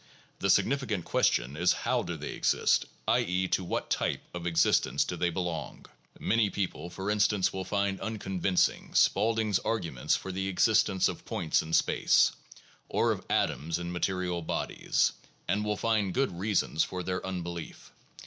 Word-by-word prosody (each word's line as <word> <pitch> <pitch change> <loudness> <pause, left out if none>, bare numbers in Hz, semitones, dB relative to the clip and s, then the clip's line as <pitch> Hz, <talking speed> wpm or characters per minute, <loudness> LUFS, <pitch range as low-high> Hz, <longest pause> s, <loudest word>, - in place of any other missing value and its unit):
The - - 0
significant 115 - +1
question 60 +4 +1
is 85 +3 +3
how - - +2
do - - -5
they - - -5
exist, - - +2 0.2
i. - - +4
e., 90 +1 0
to 95 - +1
what 85 - -3
type - - 0
of 90 0 -4
existence 85 -1 +3
do - - -4
they 90 - 0
belong. 85 -2 -4 0.3
Many 110 -1 +2
people, 95 -3 -3
for 95 +3 -3
instance, 105 -2 +2
will 95 0 -4
find 100 0 -1
unconvincing 95 -4 -1
Spaulding's 110 -3 +3
arguments 85 - -1
for 95 - -5
the 95 +1 -2
existence 105 0 +3
of - - -5
points 80 - 0
in 80 - -8
space, - - +4 0.6
or - - +2
of - - -3
atoms 80 +3 0
in 85 0 -5
material 90 -1 -1
bodies, 80 - 0 0.4
and 105 +1 +1
will 105 0 -1
find 110 -5 0
good 135 +1 +1
reasons 90 -3 0
for 90 -1 -4
their 90 +1 -3
unbelief. 85 -3 -6
95 Hz, 160 wpm, -29 LUFS, 85-105 Hz, 0.6 s, i